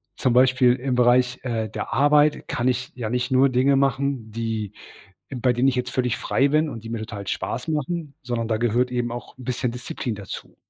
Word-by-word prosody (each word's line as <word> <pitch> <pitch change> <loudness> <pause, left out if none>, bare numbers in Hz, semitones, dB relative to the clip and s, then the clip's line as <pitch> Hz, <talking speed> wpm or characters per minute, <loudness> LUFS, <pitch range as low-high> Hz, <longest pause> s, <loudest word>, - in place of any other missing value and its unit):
zum 130 - +1
Beispiel 125 0 +5
im 130 +1 -2
Bereich, 125 0 +3
äh, 115 -3 -2
der 105 +1 -5
Arbeit 145 +3 +3
kann 120 - -1
ich 125 0 -1
ja 115 -4 -4
nicht 125 +3 -1
nur 130 +1 +5
Dinge 130 +2 +3
machen, 135 -4 0
die 110 -2 -3 0.6
bei 125 -1 +1
denen 125 +3 +2
ich 135 - +2
jetzt 125 0 -2
völlig 125 -2 0
frei 135 - +1
bin 155 +2 +2
und 115 -5 -8
die 115 - -7
mir 115 -1 -3
total 105 -3 -7
Spaß 125 - -3
machen, 155 0 -3
sondern 120 -2 -2
da 110 -1 0
gehört 120 +2 +1
eben 120 -1 -1
auch 120 +1 -8
'n 130 - -11
bisschen 125 -1 -1
Disziplin 120 -1 -5
dazu. 100 -1 -8
125 Hz, 210 wpm, -23 LUFS, 115-130 Hz, 0.6 s, Beispiel